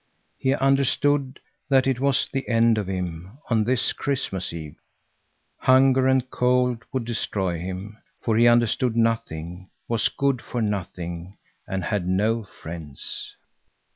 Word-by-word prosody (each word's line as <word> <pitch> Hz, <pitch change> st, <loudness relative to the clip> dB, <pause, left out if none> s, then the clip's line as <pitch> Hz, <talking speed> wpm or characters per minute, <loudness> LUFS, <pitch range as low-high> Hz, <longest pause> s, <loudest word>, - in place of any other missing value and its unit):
He 135 Hz, +1 st, +2 dB
understood 135 Hz, 0 st, +2 dB, 0.3 s
that 135 Hz, -2 st, +4 dB
it 135 Hz, -2 st, +1 dB
was 135 Hz, 0 st, +2 dB
the 135 Hz, 0 st, -2 dB
end 115 Hz, -1 st, +4 dB
of 100 Hz, -, -3 dB
him, 90 Hz, +2 st, -5 dB
on 110 Hz, -2 st, +3 dB
this 125 Hz, +1 st, +2 dB
Christmas 125 Hz, -10 st, -2 dB
Eve. 80 Hz, -3 st, -7 dB, 0.8 s
Hunger 130 Hz, 0 st, +5 dB
and 130 Hz, -1 st, +2 dB
cold 125 Hz, -1 st, +1 dB
would 130 Hz, -3 st, -2 dB
destroy 95 Hz, -7 st, -2 dB
him, 95 Hz, +5 st, -6 dB, 0.2 s
for 115 Hz, -, +1 dB
he 120 Hz, +2 st, +5 dB
understood 120 Hz, +1 st, +3 dB
nothing, 95 Hz, -6 st, -1 dB, 0.2 s
was 115 Hz, -2 st, +2 dB
good 140 Hz, -3 st, 0 dB
for 120 Hz, -, -5 dB
nothing 90 Hz, -3 st, -4 dB, 0.3 s
and 95 Hz, -2 st, -2 dB
had 100 Hz, -2 st, -1 dB
no 110 Hz, +5 st, +1 dB
friends. 80 Hz, -6 st, -7 dB
115 Hz, 135 wpm, -24 LUFS, 95-130 Hz, 0.8 s, Hunger